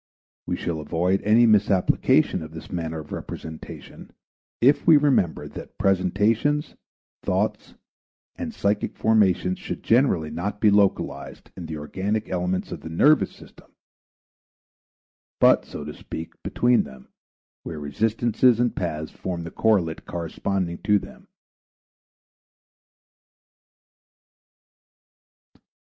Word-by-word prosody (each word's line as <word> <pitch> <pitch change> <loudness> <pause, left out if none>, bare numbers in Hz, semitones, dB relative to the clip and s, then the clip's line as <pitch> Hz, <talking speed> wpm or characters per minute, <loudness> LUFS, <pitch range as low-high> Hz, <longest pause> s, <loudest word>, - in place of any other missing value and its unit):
We - - -1
shall 85 -2 -3
avoid 85 +5 0
any 110 +3 +5
misapplication 100 -4 +3
of 80 0 -9
this 80 - -10
manner 80 -2 -3
of 75 - -14
representation 80 -1 -8 0.5
if 140 +6 +3
we 160 -3 +8
remember 135 - +1
that - - -10
presentations, 105 - +1 0.5
thoughts, - - -2 0.6
and 255 -4 -5
psychic 105 - -1
formations 95 -4 +2
should - - -6
generally 110 - +2
not 100 +6 -4
be 105 -1 +4
localized 100 -1 0
in 85 -3 -7
the 80 -1 -5
organic 100 +8 -3
elements 90 0 -2
of - - -6
the - - -8
nervous 150 - +4
system, - - -18 1.6
but, - - +5
so - - -8
to - - -6
speak, 80 +1 -8
between 120 0 +2
them, 65 -1 -11 0.5
where 80 - -7
resistances 115 - +2
and 120 -1 +1
paths 80 -3 -3
form 90 -2 -5
the 85 - -7
correlate 95 -8 +1
corresponding 85 +1 -3
to 105 -1 +3
them. 200 - -10
95 Hz, 110 wpm, -24 LUFS, 85-115 Hz, 1.6 s, we